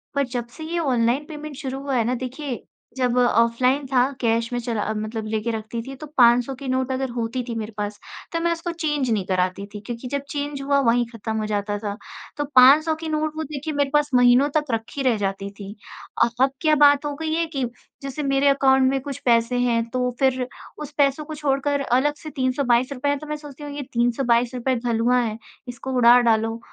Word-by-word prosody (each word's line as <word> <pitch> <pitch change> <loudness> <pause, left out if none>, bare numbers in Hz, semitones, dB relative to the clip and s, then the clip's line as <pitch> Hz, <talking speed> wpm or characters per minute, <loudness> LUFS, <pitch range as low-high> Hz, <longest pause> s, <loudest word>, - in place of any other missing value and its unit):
पर 280 - +2
जब 245 -2 -4
से 315 - -7
ये 335 +2 -2
ऑनलाइन 255 -2 +1
पेमेंट 300 -2 -8
शुरू 270 -2 -5
हुआ 275 -1 -2
है 235 - +2
ना 250 +2 0
देखिए 255 +1 -5 0.3
जब 250 -1 +1
ऑफ़लाइन 250 +3 +3
था 255 -1 +3 0.2
कैश 230 0 +1
में 245 - 0
चला 230 -3 -2
अ, 215 - -2
मतलब 215 +1 -4
लेके 220 +1 -1
रखती 225 +1 -4
थी 270 - -7
तो 305 +3 -9
500 245 +2 +5
की 270 +1 -8
नोट 260 0 0
अगर 260 0 -2
होती 235 +1 -2
थी 230 - -3
मेरे 220 -1 -4
पास 205 0 -4 0.3
तो 335 - 0
मैं 340 0 +1
उसको 335 +1 -4
चेंज 295 -6 -1
नहीं 210 -4 0
कराती 185 +1 0
थी 210 - -6
क्योंकि 240 +2 -6
जब 280 0 -1
चेंज 285 -1 -4
हुआ 280 0 +2
वहीं 240 -1 +3
ख़त्म 220 -1 -5
हो 215 - -1
जाता 205 0 -2
था, 205 -1 -4 0.4
तो 290 - -1
500 295 +5 +7
की 320 0 -6
नोट 310 0 -1
वो 315 - -2
देखिए 300 +1 -5
मेरे 285 -1 +1
पास 295 0 +3
महीनों 245 +3 +5
तक 300 - 0
रखी 225 +5 -3
रह 245 -4 +2
जाती 195 0 -3
थी। 200 +1 -7 0.5
अ - - +4 0.2
अब 265 - +3
क्या 310 -2 +4
बात 290 0 +5
हो 290 - -2
गई 315 +1 -3
है 330 +1 +1
कि 265 -2 0 0.4
जैसे 275 +2 -5
मेरे 275 0 +2
अकाउंट 265 -1 +4
में 270 - 0
कुछ 280 0 -6
पैसे 235 0 +3
हैं 235 -2 +2
तो 250 +1 0
फ़िर 260 -2 +1 0.3
उस 300 -1 -7
पैसों 285 +1 +2
को 310 0 -7
छोड़कर 285 -1 0
अलग 265 +3 +2
से 310 - -6
₹322 255 0 0
है 285 - +1
तो 305 - -10
मैं 300 - -3
सोचती 295 -1 -11
हूँ 290 - -6
ये 290 - -4
₹322 240 +1 +1
हलुआ 240 +1 +2
है 220 -2 -3 0.3
इसको 245 +2 -6
उड़ा 240 0 +7
डालो 225 -1 +1
255 Hz, 220 wpm, -23 LUFS, 235-285 Hz, 0.5 s, 500